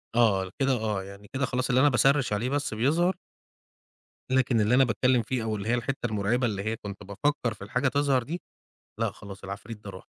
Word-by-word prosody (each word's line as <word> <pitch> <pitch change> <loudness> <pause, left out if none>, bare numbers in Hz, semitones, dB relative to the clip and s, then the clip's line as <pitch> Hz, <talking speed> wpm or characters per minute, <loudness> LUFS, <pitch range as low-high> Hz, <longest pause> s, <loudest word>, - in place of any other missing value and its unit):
آه، 100 -5 +3
كده 135 -1 +3
آه، 110 -5 -1
يعني 100 +1 -11
كده 130 0 +1
خلاص 130 +1 -1
اللي 125 0 +4
أنا 145 - +6
باسرِّش 135 -2 +3
عليه 115 +5 0
بس 145 -3 -1
بيظهَر 160 - +2 1.2
لكن 130 -3 +3
اللي 105 +4 +3
أنا 135 - +6
باتكلّم 125 +1 +2
فيه 120 +1 -2
أو 110 -1 -1
اللي 105 +1 -4
هي - - +3
الحِتّة 120 +2 -2
المُرعِبة 110 +3 +1
اللي 100 -3 -3
هي 110 +2 -1
كنت 100 -3 -8
بافكّر 115 +4 -1
في 100 - -11
الحاجة 125 +6 0
تظهَر 140 -2 +2
دي، 165 +8 -5 0.6
لأ - - +1
خلاص 100 -1 -11
العفريت 100 +3 -7
ده 100 - -7
راح، 95 -1 -9
120 Hz, 205 wpm, -27 LUFS, 105-130 Hz, 1.2 s, أنا